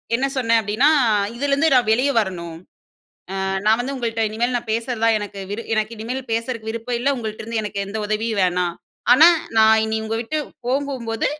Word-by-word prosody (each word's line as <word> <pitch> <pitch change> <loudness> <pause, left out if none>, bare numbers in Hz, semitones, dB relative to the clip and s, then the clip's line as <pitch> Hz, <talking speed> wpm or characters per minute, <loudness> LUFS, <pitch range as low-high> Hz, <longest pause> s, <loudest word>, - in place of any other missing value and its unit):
என்ன 265 +3 0
சொன்னேன் 230 -2 +3
அப்டீன்னா, 220 +7 +2 0.5
"இதுலேருந்து 280 +4 +1
நான் 245 -4 +3
வெளியே 255 +5 +2
வரணும். 170 -5 -4 0.9
அ - - -1 0.2
நான் 220 +1 +5
வந்து 265 +3 -3
உங்கள்ட்ட 230 -3 -2
இனிமே 230 +3 0
நான் 230 - -8
பேசுறதா 230 +1 -2
நான் 225 -1 +4
எனக்கு 205 -1 -7
விரு 225 +3 -4
எனக்கு 215 +1 -1
இனிமே 225 +3 -4 0.2
பேசுறதுக்கு 230 -1 -3
விருப்பம் 230 +2 -3
இல்ல. 280 +3 +1
உங்கள்ட்டருந்து 220 0 -4
எனக்கு 200 -1 -3
எந்த 205 +3 -5
உதவியும் 215 0 -1
வேணாம். 180 -1 0 0.4
ஆனா 305 +6 +8 0.3
நான் 220 0 +6
இனி 220 0 -1
உங்க 220 +1 -2
விட்டு 275 +7 -3 0.3
போகும்போது 255 -4 -1
225 Hz, 175 wpm, -21 LUFS, 215-245 Hz, 0.9 s, ஆனா